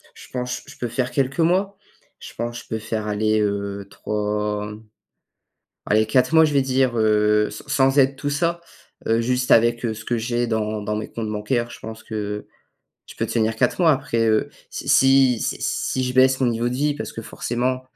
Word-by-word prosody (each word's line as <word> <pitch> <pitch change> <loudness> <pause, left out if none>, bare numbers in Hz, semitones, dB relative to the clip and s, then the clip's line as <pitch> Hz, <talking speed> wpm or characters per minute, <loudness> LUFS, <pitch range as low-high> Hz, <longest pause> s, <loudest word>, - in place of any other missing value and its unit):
je - - -13
pense 125 0 -3
je - - -13
peux 120 - -3
faire 125 +2 -1
quelques 135 +1 -1
mois. 190 +4 +2 0.4
Je - - -10
pense 120 0 -4
je - - -24
peux 110 - -2
faire 110 0 -4
allez, 110 +1 +1
heu, 100 -1 -2
3, 105 0 -2 1.1
allez, 110 +1 +3
4 130 +6 +2
mois 160 0 +7
je 150 - -1
vais 140 - +4
dire, 130 -2 +1
heu, 105 -1 +3
sans - - -10 0.2
sans 140 - +2
aide, 135 0 +4
tout 145 - -2
ça. 170 +4 0 0.5
Heu, 115 +1 +3
juste 125 +1 0
avec 120 +1 +4
ce 110 -2 -4
que 120 - 0
j'ai 120 +1 -1
dans 110 -1 -1
dans 105 +1 -2
mes 110 - -5
comptes 115 -2 -4
bancaires, 120 +3 -1
je - - -11
pense 110 0 -9
que 105 -1 -5 0.6
je - - -12
peux - - -1
tenir 110 -1 0
4 110 - +1
mois. 165 -3 +6
Après, 115 -5 0
heu, 110 0 +2 0.2
si - - -7
si 135 -3 +5
si - - -2
si 130 - -1
je 125 - -2
baisse 130 +1 +4
mon 125 - +3
niveau 120 +1 0
de 125 - -3
vie 145 +2 0
parce - - -6
que, 115 - -7
forcément, 125 +3 -2
120 Hz, 205 wpm, -22 LUFS, 110-130 Hz, 1.1 s, mois